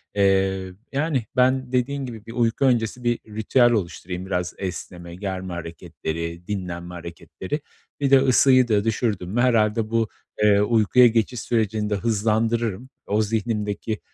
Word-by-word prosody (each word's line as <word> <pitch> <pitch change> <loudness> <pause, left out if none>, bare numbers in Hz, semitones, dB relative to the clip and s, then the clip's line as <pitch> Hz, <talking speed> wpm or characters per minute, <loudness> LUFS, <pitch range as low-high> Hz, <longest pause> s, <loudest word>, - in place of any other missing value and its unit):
Eee, 95 -1 +2 0.2
yani, 140 -4 0
ben, 130 0 +2
dediğin 135 +2 0
gibi 115 -4 -9
bir 115 - -9
uyku 120 +2 +1
öncesi 120 -1 +1
bir 120 -1 +1
ritüel 110 +3 +3
oluşturayım 90 -3 -3
biraz 90 -2 -2
esneme, 90 -1 -6
germe 95 -1 -5
hareketleri, 85 0 -6
dinlenme 90 -3 -5
hareketleri. 90 - -6 0.4
Bir 140 -1 +1
de 135 - +8
ısıyı 130 -1 +5
da 105 -3 +2
düşürdüm 110 -5 -1
mü 115 +5 0
herhâlde 110 -3 +2
bu, 115 -1 +1 0.4
eee, 105 -1 +5
uykuya 115 +3 +5
geçiş 115 +1 0
sürecini 110 -3 -1
de 105 - +1
hızlandırırım. 115 +2 0 0.2
O 105 +2 +2
zihnimdeki, 110 0 -2
110 Hz, 140 wpm, -23 LUFS, 95-120 Hz, 0.4 s, de